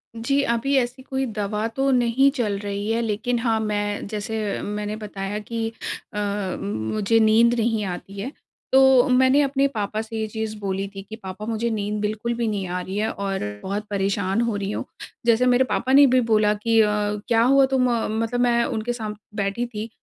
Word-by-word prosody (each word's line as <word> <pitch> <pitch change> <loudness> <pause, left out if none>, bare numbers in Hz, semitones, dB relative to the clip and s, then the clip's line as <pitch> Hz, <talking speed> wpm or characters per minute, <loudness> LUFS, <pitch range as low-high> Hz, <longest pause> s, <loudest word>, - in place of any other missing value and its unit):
जी, 275 +5 +1
अभी 235 +3 0
ऐसी 250 +1 -1
कोई 265 0 -2
दवा 210 -1 -2
तो 270 0 +1
नहीं 250 +2 +4
चल 215 -6 0
रही 205 +1 -3
है। 230 +1 +1
लेकिन 230 +2 -1
हाँ, 230 -2 +1
मैं 205 -1 -2
जैसे 215 0 -3
मैंने 210 0 -3
बताया 205 -1 -5
कि 225 +1 -3 0.5
अ, 205 -2 -2
मुझे 150 - 0
नींद 225 +2 +5
नहीं 225 -1 +1
आती 195 +2 -6
है, 250 +8 -4 0.4
तो 265 0 +6
मैंने 260 +2 +5
अपने 275 0 +2
पापा 215 -4 -3
से 225 0 -7
ये 220 - -1
चीज़ 220 0 -4
बोली 195 -1 -2
थी 195 - -5
कि, 220 - -6
"पापा 195 -1 -8
मुझे 230 +1 -1
नींद 210 -1 -2
बिल्कुल 215 +3 -2
भी 235 -1 -1
नहीं 200 -3 -2
आ 180 +1 -2
रही 190 +2 -5
है 215 +1 0
और 195 -1 -3 0.2
बहुत 200 +2 -3
परेशान 200 0 0
हो 235 -2 0
रही 200 0 -2
हूँ।" - - -3 0.4
जैसे 235 +1 +4
मेरे 250 +1 +4
पापा 255 - 0
ने 285 +1 +8
भी 255 - +5
बोला 215 -1 +4
कि 225 +2 +1
अ, 210 - +4 0.4
क्या 230 -1 +3
हुआ 270 +2 +5
तुम 255 -1 +3
अ, 230 - -1
मतलब 225 +3 -1
मैं 240 -1 +3
उनके 230 0 -2
सामने 215 -2 -8
बैठी 200 +5 -1
थी 225 -1 -6
220 Hz, 200 wpm, -23 LUFS, 205-240 Hz, 0.5 s, ने